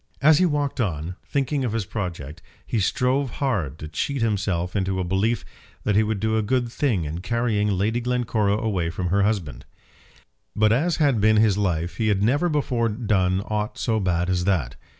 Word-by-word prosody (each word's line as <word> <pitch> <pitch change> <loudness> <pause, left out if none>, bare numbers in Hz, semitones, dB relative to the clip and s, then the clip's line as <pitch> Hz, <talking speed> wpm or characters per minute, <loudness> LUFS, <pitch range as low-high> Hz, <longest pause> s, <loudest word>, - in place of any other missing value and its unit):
As 155 +3 +5
he 185 - +4
walked 145 -4 -1
on, 85 -4 -2
thinking 140 0 -1
of 120 -4 -1
his 115 -3 -1
project, 85 -7 -5 0.2
he 115 - -1
strove 125 +6 +1
hard 100 - -1
to 75 - -7
cheat 130 - -2
himself 95 -5 -1
into 95 -1 0
a - - 0
belief 95 +5 0 0.4
that 105 - +1
he 105 - +5
would 110 -1 -1
do 110 +2 0
a - - +2
good 120 +2 0
thing 115 - 0
in 80 +3 -4
carrying 110 0 0
Lady 105 +4 0
Glencora 115 -4 0
away 95 -7 -1
from 90 +2 -3
her 100 +3 +2
husband. 100 -7 -1 0.9
Bad 110 0 +3
as 160 +8 +1
had 140 - +2
been 110 +1 +4
his 105 -2 +4
life 90 -4 -1
he 110 - 0
had 100 -2 +2
never 145 +10 +2
before 125 -6 0
done 100 -4 +1
aught 105 +2 -3
so 110 -2 0
bad 90 -3 0
as 90 -1 0
that. 85 -11 0
105 Hz, 190 wpm, -24 LUFS, 95-120 Hz, 0.9 s, As